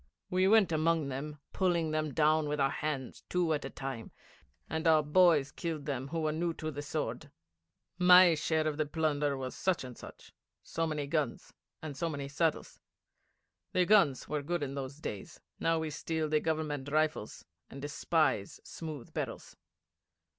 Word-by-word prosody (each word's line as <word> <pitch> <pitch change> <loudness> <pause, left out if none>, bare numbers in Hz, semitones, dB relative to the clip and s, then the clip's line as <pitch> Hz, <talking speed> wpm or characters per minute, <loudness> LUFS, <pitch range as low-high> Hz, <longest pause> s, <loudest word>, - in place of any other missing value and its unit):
We 185 +1 +3
went 210 -3 +5
among 160 -2 +1
them, 145 +3 -5 0.2
pulling 170 -4 +1
them 155 -1 -1
down 155 0 +3
with 150 0 -1
our 135 0 +3
hands 140 -4 -4
two 175 -3 +1
at 150 - -2
a - - -4
time, 135 -4 -6 0.6
and 160 +2 -2
our 155 -1 +5
boys 150 -2 +4
killed 160 -4 -4
them 135 -3 -3
who 165 +3 -3
were 155 -1 +1
new 165 +1 -1
to 155 0 -4
the 145 0 -5
sword. 150 0 -4 0.7
My 180 -1 +8
share 155 0 0
of 150 -1 -2
the 155 -1 0
plunder 145 -2 0
was 130 -1 -4
such 185 -6 0
and 125 -2 -8
such - - -13 0.3
so 165 0 -2
many 150 -2 -2
guns, 145 -3 -2 0.3
and 150 -3 -5
so 170 +3 -1
many 140 -3 -4
saddles. 160 +2 -1 0.9
The 180 -1 +3
guns 175 -10 +4
were 150 -1 -2
good 170 +2 -2
in 135 -1 -3
those 135 0 -5
days. 105 -10 -7 0.2
Now 165 0 +2
we 160 -1 -2
steal 160 +1 -2
the 155 0 +2
Government 150 -3 -2
rifles, 155 -6 -1 0.2
and 135 - -9
despise 145 -5 0
smooth 155 -7 -8
barrels. - - -5
155 Hz, 170 wpm, -32 LUFS, 145-165 Hz, 0.9 s, My